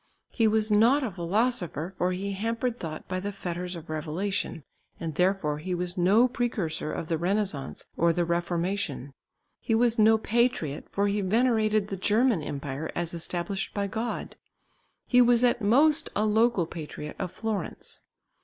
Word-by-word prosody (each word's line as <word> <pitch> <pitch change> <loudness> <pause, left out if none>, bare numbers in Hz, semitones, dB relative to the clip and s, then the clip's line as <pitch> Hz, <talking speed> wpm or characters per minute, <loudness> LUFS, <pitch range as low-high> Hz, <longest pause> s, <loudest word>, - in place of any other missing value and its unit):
He 225 -3 +2
was 215 0 +2
not 235 +7 +5
a 235 - -2
philosopher, 180 - -1
for 180 0 0
he 195 +2 -3
hampered 230 +4 -2
thought 155 -2 -6
by 185 0 -2
the 200 +2 -3
fetters 180 -2 -5
of 165 0 -9
revelation, 160 +2 -3 0.4
and 165 -2 -4
therefore 180 -3 +1
he 180 +3 -3
was 175 0 -2
no 200 +7 +4
precursor 215 -12 -2
of 160 - -4
the 165 -1 -1
Renaissance 185 -5 -2
or 170 0 +4
the 175 +1 0
Reformation. 170 -4 -2 0.5
He 225 - 0
was 235 0 +3
no 220 +1 +6
patriot, 220 - 0
for 200 +1 0
he 205 +1 0
venerated 215 0 +2
the 195 - -3
German 215 0 +2
empire 140 +1 -4
as 175 -1 -2
established 175 +3 -3
by 200 -1 0
God. 225 +4 -4 0.7
He 250 0 +5
was 240 0 +5
at 240 -1 +3
most 290 +9 +4
a 210 - +2
local 220 -3 +3
patriot 150 -2 -7
of - - -2
Florence. 215 -5 -4
195 Hz, 160 wpm, -27 LUFS, 170-225 Hz, 0.7 s, no